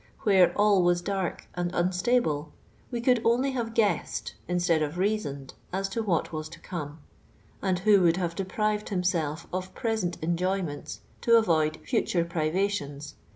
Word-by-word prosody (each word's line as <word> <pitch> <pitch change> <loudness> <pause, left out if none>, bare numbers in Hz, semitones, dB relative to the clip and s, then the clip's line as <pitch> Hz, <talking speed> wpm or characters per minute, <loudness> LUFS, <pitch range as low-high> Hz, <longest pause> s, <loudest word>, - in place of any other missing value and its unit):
< - - -29
Whore 190 -4 +6
all 205 -2 +4
was 175 0 +2
diirk 195 -2 -2
and 175 0 -2
unstiiblo, 180 -3 +1 0.4
we 240 -2 -3
could 245 -1 +3
only 250 +4 +2
have 230 -3 -3
guessed 205 -7 0
instead 175 -2 +2
of 155 +2 -2
reasoned 180 -9 -2 0.2
as 195 +1 -1
to 225 +4 -2
what 180 -6 0
was 155 0 -4
to 170 - -11
como; 150 -4 -6 0.6
and 190 -2 +1
who 200 +1 +5
would 170 -1 +4
have 175 -3 -1
deprived 210 +3 -1
him«elf 170 -5 -1
of 185 0 -4
present 220 -7 -1
enjoynieiitsi 175 -2 -2 0.2
to 230 0 +6
avoid 155 -8 +2
future 170 -2 +1
priv:itions. 155 -3 -2
180 Hz, 155 wpm, -27 LUFS, 165-210 Hz, 0.6 s, Whore